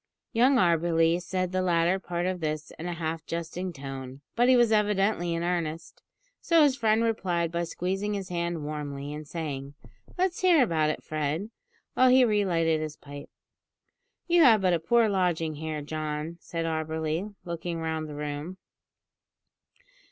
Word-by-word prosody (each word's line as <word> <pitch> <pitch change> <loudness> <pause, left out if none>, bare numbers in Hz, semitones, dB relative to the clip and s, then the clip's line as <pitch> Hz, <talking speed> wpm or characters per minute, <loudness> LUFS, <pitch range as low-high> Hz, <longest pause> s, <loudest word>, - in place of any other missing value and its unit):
Young 255 +4 +4
Auberly 170 -2 +3
said 185 0 -2
the 185 0 0
latter 175 +1 +2
part 175 -1 -3
of 185 -1 -1
this 155 -1 -3
in 170 - -4
a 175 - -2
half 165 -1 -3
jesting 170 +2 -4
tone, 135 -2 -8
but 245 +2 +4
he 260 - +7
was 240 -2 +4
evidently 205 -4 +2
in 165 - -2
earnest, 165 -2 -3 0.4
so 335 -2 +4
his 280 -3 +4
friend 225 -2 +2
replied 180 -7 0
by 170 0 -1
squeezing 195 +5 -2
his 195 -2 -5
hand 170 -2 -2
warmly, 145 -1 -5
and 150 0 -7
saying, 145 -4 -5 0.4
"Let's 365 -1 0
hear 350 -6 +5
about 160 -8 +1
it, 155 - -3
Fred," 155 +7 -2 0.4
while 255 0 +5
he 255 0 +6
re 210 -3 +2
lighted 165 -4 +1
his 155 -1 -5
pipe. 145 0 -10 1.0
"You 345 -1 +4
have 230 -8 +7
but 185 -2 +3
a 170 - +2
poor 230 +8 +3
lodging 175 -5 0
here, 155 0 -4
John," 155 +2 -4
said 165 0 -4
Auberly, 160 +4 -2
looking 170 0 -4
round 160 -1 -3
the 150 - -7
room. 150 +4 -5
170 Hz, 165 wpm, -27 LUFS, 155-195 Hz, 1.0 s, he